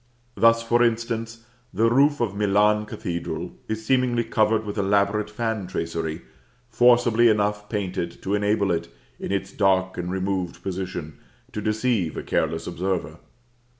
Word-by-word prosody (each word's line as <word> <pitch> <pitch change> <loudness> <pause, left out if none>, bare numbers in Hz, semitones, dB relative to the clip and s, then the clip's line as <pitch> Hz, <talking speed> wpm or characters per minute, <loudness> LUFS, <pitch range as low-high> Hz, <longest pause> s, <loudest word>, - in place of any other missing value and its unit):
Thus, 115 0 +4
for 120 +1 +2
instance, 115 -1 -1 0.3
the 110 +4 +2
roof 140 +5 +3
of 110 -5 0
Milan 105 +1 +2
Cathedral 85 -1 -4 0.2
is 110 0 -4
seemingly 125 -2 +2
covered 110 -1 +1
with 105 0 -4
elaborate 100 +1 +1
fan 110 -3 -3
tracery, 80 -1 -3 0.5
forcibly 120 0 +5
enough 105 -1 0
painted 95 -5 -3
to 95 - -1
enable 105 -1 +1
it, 85 0 -1 0.3
in - - -5
its 95 0 -2
dark 95 -2 +1
and 90 0 -3
removed 95 -2 -2
position, 90 -5 -5 0.3
to 105 - -4
deceive 110 -5 0
a - - -4
careless 80 +1 -1
observer. 90 -2 -3
105 Hz, 140 wpm, -24 LUFS, 90-115 Hz, 0.5 s, forcibly